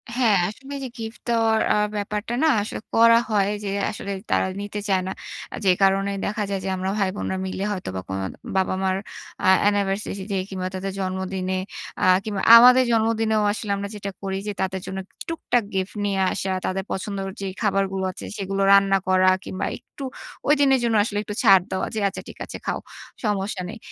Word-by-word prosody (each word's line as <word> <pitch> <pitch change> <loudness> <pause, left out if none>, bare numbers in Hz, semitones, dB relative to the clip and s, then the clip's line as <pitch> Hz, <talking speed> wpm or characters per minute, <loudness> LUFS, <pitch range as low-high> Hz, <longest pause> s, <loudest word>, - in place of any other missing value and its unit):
হ্যাঁ, 235 -5 +4
আসলে 270 +6 -11
এই - - -7
যে - - -5
গিফট 225 0 -7
দেওয়ার 225 -1 +3 0.2
আ - - +2 0.2
ব্যাপারটা 210 +2 -3
না, - - +5
আসলে 210 - -5 0.2
করা 230 0 +7
হয় 205 -2 +2
যে, 200 - -2 0.2
আসলে 200 -2 -6 0.2
তারা - - +3
নিতে 205 0 -5
চায় 190 -1 +3
না। 190 - -2 0.4
আ - - -3
যে 190 - +6
কারণে 195 +1 +3
দেখা 210 +1 -1
যায় 195 - -1
যে, - - -1
আমরা 185 +1 -2
ভাই-বোনরা 190 -1 -1
মিলে 190 +1 -3
হয়তোবা 95 - -4
কোন 95 0 -2 0.4
বাবা-মার 190 0 +1 0.5
আ - - +4 0.2
অ্যানিভার্সারিতে 200 -1 0
কিংবা 185 -1 -3
তাদের 195 +1 -3
জন্মদিনে 185 0 -2 0.4
আ - - +4 0.2
কিংবা 205 -3 -3 0.2
আমাদের 250 +2 +8
জন্মদিনেও 220 -1 +2
আসলে 210 0 -4
আমরা 200 0 -4
যেটা 200 -1 -5
করি 195 -1 -2
যে, - - 0
তাদের 190 0 -2
জন্য 190 0 -4 0.3
টুকটাক 250 -7 0
গিফট 190 +2 -2
নিয়ে 200 -1 0
আসা, 190 - -2
তাদের 190 +1 -1
পছন্দ'র 195 0 -3 0.2
যে - - -3 0.2
খাবারগুলো 195 -2 0
আছে - - -9
সেগুলো 195 0 -2
রান্না 195 0 +5
করা 185 0 +5
কিংবা 185 - -4
একটু 280 - -12 0.5
ঐদিনের 280 -3 +5
জন্য 230 -1 +2
আসলে 205 -1 -3
একটু 210 - -6
ছাড় 195 -2 +7
দেওয়া 190 - -1
যে, 220 - -1
"আচ্ছা 195 - -5
ঠিক - - -10
আছে, - - -7
খাও - - -1 0.5
সমস্যা 200 -2 -1
নেই।" 220 - -7
200 Hz, 185 wpm, -23 LUFS, 190-220 Hz, 0.5 s, আমাদের